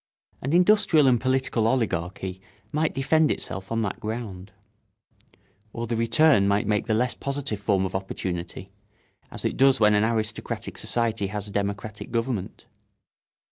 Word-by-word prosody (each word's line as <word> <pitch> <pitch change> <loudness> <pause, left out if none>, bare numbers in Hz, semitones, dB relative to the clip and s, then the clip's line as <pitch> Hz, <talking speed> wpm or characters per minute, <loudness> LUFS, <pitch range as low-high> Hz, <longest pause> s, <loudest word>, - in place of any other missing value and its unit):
An 135 - -2
industrial 180 -3 +4
and 125 -3 +4
political 130 -3 +1
oligarchy 95 -5 -2 0.3
might 155 +1 0
defend 155 +3 +3
itself 95 +2 -4
on 115 0 0
that 100 - -3
ground. 105 -4 -6 1.2
Or 115 - -3
the 115 0 -2
return 115 -1 +4
might 100 +1 +1
take 105 -1 0
the 110 - +2
less 125 +2 +1
positive 140 -6 -3
form 100 -2 +1
of 95 - -4
opportunity, 90 -2 -5 0.6
as - - -7
it - - -1
does 135 0 +5
when 105 -1 +5
an 105 0 +3
aristocratic 110 -1 -2
society 115 -4 0
has 105 +1 -4
a - - -10
democratic 100 +1 -4
government. 115 -4 -3
110 Hz, 145 wpm, -25 LUFS, 100-130 Hz, 1.2 s, does